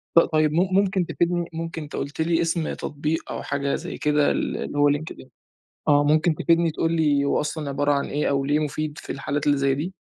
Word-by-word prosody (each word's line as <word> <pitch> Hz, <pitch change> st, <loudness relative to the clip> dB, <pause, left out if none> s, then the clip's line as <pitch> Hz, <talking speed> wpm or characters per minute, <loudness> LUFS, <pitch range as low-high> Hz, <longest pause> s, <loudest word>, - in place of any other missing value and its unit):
ط -, -, +10 dB
طيب 155 Hz, -2 st, +2 dB
م 170 Hz, -, +2 dB
ممكن 190 Hz, -2 st, +2 dB
تفيدني؟ 175 Hz, 0 st, -1 dB
ممكن 165 Hz, 0 st, -5 dB
أنت 150 Hz, -, -8 dB
قُلت 145 Hz, +3 st, -4 dB
لي 165 Hz, +1 st, +2 dB
إسم 165 Hz, -1 st, -1 dB
تطبيق 150 Hz, +2 st, -3 dB
أو -, -, -4 dB
حاجة 140 Hz, 0 st, -1 dB
زي 175 Hz, +2 st, -6 dB
كده 150 Hz, -1 st, +2 dB
ال -, -, -1 dB
اللي 145 Hz, -, -5 dB
هو 145 Hz, 0 st, +5 dB
Linked 150 Hz, +2 st, -3 dB
in 130 Hz, -, -12 dB, 0.6 s
آه 145 Hz, -1 st, +5 dB
ممكن 155 Hz, +2 st, +3 dB
تفيدني 165 Hz, 0 st, +2 dB
تقول 165 Hz, +2 st, -1 dB
لي 150 Hz, -4 st, +2 dB
هو -, -, +1 dB
أصلًا 150 Hz, -1 st, -3 dB
عبارة 145 Hz, +1 st, +1 dB
عن 140 Hz, -, 0 dB
إيه، 150 Hz, +1 st, -1 dB
أو 140 Hz, -1 st, 0 dB
ليه 145 Hz, +2 st, +2 dB
مفيد 155 Hz, +1 st, -3 dB
في -, -, -7 dB
الحالات 140 Hz, +2 st, -3 dB
اللي 145 Hz, -1 st, +4 dB
زي 135 Hz, 0 st, +2 dB
دي؟ 165 Hz, +7 st, -4 dB
150 Hz, 225 wpm, -24 LUFS, 145-165 Hz, 0.6 s, ط